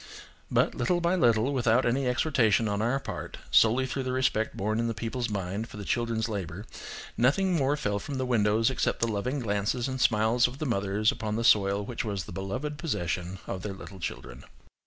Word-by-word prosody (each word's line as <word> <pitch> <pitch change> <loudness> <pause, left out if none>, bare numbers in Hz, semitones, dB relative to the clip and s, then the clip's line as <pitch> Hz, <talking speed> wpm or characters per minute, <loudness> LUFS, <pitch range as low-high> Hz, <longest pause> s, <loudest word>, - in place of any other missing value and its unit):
But, - - +2
little 180 -1 +1
by 170 +1 +2
little, 120 -4 +3
without 125 -1 +3
any 125 +2 +1
exhortation 120 -4 +2
on 100 0 -1
our 120 +5 +1
part, - - -6
solely 120 +4 +5
through 135 +1 -3
the 130 -1 -2
respect 130 -4 0
born 110 +3 0
in 115 - +1
the 115 - -2
people's 115 +2 -3
mind 100 +2 -3
for - - -10
the 100 - -6
children's 115 -1 0
labour, 100 -2 -5 0.5
nothing 180 +10 +3
more 145 -1 +2
fell 105 -8 -1
from 140 +7 -6
the 130 0 -1
windows, 115 -1 +2
except 130 - 0
the 115 - +3
loving 115 +6 -2
glances 105 +3 -1
and 130 -1 -3
smiles 115 +2 +3
of 125 +2 -8
the 155 - -3
mothers 105 -3 +1
upon 105 -1 -3
the 115 - -1
soil 100 -2 +4
which 120 +3 -4
was 100 -5 -3
the - - -10
beloved 125 +12 -4
possession 90 - -2
of 95 - -4
their 100 0 -4
little 95 0 -10
children. 65 -6 -6
115 Hz, 200 wpm, -28 LUFS, 105-130 Hz, 0.5 s, solely